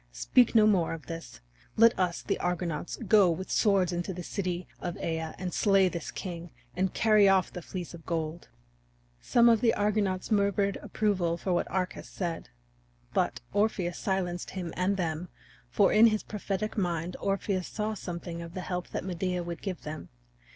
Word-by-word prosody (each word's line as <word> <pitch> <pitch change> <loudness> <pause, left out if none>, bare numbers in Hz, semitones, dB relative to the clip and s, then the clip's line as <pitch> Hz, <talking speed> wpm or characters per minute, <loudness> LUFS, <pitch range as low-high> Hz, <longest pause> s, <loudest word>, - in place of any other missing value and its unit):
Speak 240 - +3
no 215 -1 +7
more 185 -6 +3
of 165 - -8
this! 165 - -8 0.4
Let 230 +1 +7
us, 180 -2 0
the - - -1
Argonauts, 175 -2 -2
go 200 -2 +6
with 175 +3 -3
swords 195 -4 +3
into 175 +2 -3
the 180 - -6
city 180 -1 -3
of 175 -1 -4
Aea, 160 -1 -3
and 180 -1 -4
slay 195 -3 +4
this 170 -3 -5
king, 175 -2 -6 0.3
and 185 +1 +1
carry 215 -3 +5
off 190 -1 +3
the 180 - -6
Fleece 180 +1 -6
of 165 -1 -10
Gold." 165 0 -3 0.7
Some 235 - +4
of 230 -2 +5
the 230 - +3
Argonauts 205 -2 0
murmured 200 -1 +2
approval 190 -6 0
of - - -14
what 180 -2 +1
Arcas 185 0 -3
said. 170 -3 -4 0.6
But - - 0
Orpheus 205 -4 0
silenced 180 -3 -2
him 180 -3 -5
and 190 +2 +1
them, 170 -1 -2 0.4
for 200 - +3
in 220 +2 +8
his 215 -1 0
prophetic 210 0 -3
mind 175 -1 -1
Orpheus 195 -2 -1
saw 215 0 -2
something 170 -3 -6
of 170 0 -9
the 185 - -3
help 180 0 -3
that - - -5
Medea 180 -1 -2
would 170 -1 -6
give 190 -3 -5
them. 155 +1 -7
185 Hz, 175 wpm, -29 LUFS, 170-200 Hz, 0.7 s, in